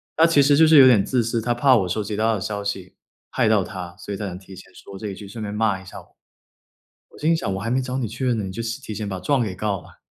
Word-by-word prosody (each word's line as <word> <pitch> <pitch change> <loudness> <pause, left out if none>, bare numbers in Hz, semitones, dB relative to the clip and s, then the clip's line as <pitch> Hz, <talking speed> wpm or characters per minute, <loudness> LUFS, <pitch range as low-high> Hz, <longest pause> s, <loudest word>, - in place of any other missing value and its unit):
他 165 - +5
其 165 -4 +4
实 140 +1 +4
就 160 +2 +6
是 155 -1 +6
有 135 - +9
点 120 -6 +6
自 125 +1 0
私， 115 +1 -1
他 120 +2 0
怕 130 +2 +4
我 95 -6 +1
收 105 +4 -1
集 105 - -4
到 110 +1 +1
的 - - -3
消 100 0 -4
息 95 -2 -5 0.4
害 - - +1
到 110 -3 +3
他， 90 -3 -8
所 100 - -7
以 - - -4
他 105 - -4
才 90 -2 -6
提 95 0 -13
前 95 - -14
说 100 - -12
这 105 - -6
一 100 - -5
句， 100 - -10
顺 110 +3 -8
便 105 -1 -4
骂 105 -3 0
一 - - -15
下 95 - -10
我。 - - -25 1.0
我 - - -17
心 160 +2 +2
想 160 -11 -2
我 - - -3
还 115 +3 -3
没 130 +2 +1
找 130 0 -4
你 125 - -1
确 120 +5 -4
认 125 -2 +1
呢， 105 - -2
你 95 - -5
就 115 - -5
先 115 +1 -4
提 110 -6 -7
前 105 0 -4
把 95 -1 -4
状 130 +9 +1
给 105 -5 -3
告 100 0 -2
了。 - - -19
110 Hz, 345 characters per minute, -22 LUFS, 100-125 Hz, 1.0 s, 有